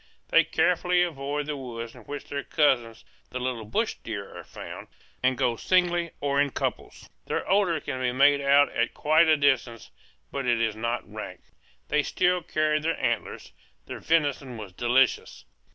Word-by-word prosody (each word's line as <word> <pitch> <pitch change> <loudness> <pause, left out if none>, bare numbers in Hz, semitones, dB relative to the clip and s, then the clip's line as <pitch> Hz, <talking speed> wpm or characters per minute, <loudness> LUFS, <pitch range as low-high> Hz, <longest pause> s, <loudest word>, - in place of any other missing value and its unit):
They - - +6
carefully 180 0 +2
avoid 145 -3 -3
the 150 0 -3
woods 115 -4 -7
in 125 - -13
which 145 0 -7
their 140 -1 -4
cousins 120 -6 +1 0.2
the 125 - -5
little 125 -3 -3
bush 215 - -1
deer 100 -3 -6
are - - -8
found, - - -9 0.3
and 130 0 +2
go 120 -1 +1
singly 175 +3 +1
or 140 0 +1
in 145 - +1
couples. - - -4 0.2
Their - - -2
odor 190 -4 +2
can 130 -3 -5
be 125 -1 +1
made 140 +2 +4
out 140 +1 +5
at 120 - -1
quite 155 +3 +4
a 155 -1 +5
distance, 130 -5 0 0.4
but 135 -2 -3
it 120 -1 +2
is 110 -2 0
not 115 +2 -3
rank. - - -8 0.5
They 150 +1 +3
still 180 +4 +1
carried 155 -1 0
their 165 +2 -1
antlers. - - -2 0.3
Their - - -7
venison 145 -6 0
was 105 -4 -9
delicious. 120 +5 +1
140 Hz, 170 wpm, -26 LUFS, 120-155 Hz, 0.5 s, They